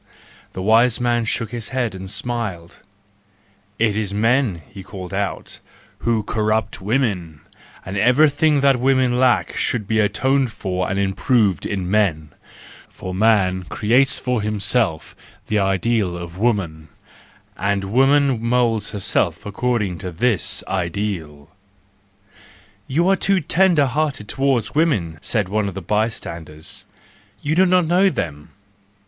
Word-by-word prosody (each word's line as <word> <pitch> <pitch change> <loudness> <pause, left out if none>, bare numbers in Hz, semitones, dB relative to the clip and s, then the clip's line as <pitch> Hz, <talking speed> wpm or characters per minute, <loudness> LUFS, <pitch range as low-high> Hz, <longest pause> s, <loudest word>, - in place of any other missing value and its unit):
" - - -27
The 95 - -5
wise 115 +3 +4
man 120 -1 +1
shook 115 0 -2
his 120 -3 -4
head 125 -5 -1
and 95 0 -8
smiled. 105 -7 -4 0.5
" 100 0 -37
It 105 - -2
is 105 -2 -2
men," 115 - +1
he 100 - -11
called 95 -2 -9
out, 100 0 -4 0.4
"who 115 -2 0
corrupt 110 -1 -1
women; 95 - -1 0.4
and 95 - -6
everything 145 - +3
that 135 -2 +3
women 130 -1 +2
lack 125 -2 +2
should 110 -5 -1
be 110 0 +1
atoned 130 +4 +1
for 95 -3 -3
and 95 - -2
improved 100 - +1
in 95 -3 -3
men,—for 90 -1 -4
man 95 -2 +2
creates 125 +8 +2
for 125 -3 -1
himself 105 -4 -1 0.3
the 105 - 0
ideal 95 0 0
of 85 -1 -8
woman, 95 -9 -1 0.7
and 100 -1 -1
woman 135 +4 +2
moulds 115 -3 +1
herself 100 -2 0
according 105 -4 -1
to 90 - -5
this 110 +3 +1
ideal"—"You 100 - -6
are 195 - +4
too 195 0 +2
tender 170 -2 +3
hearted 140 -4 -2
towards 135 -4 0
women," 105 - 0
said 105 +4 0
one 105 +1 -1
of 95 - -6
the - - -3
bystanders, 85 -7 -4 0.3
" 100 0 -32
you 145 - 0
do 185 +3 +4
not 180 -1 +3
know 180 +4 +3
them 75 - -5
105 Hz, 135 wpm, -20 LUFS, 95-125 Hz, 0.7 s, wise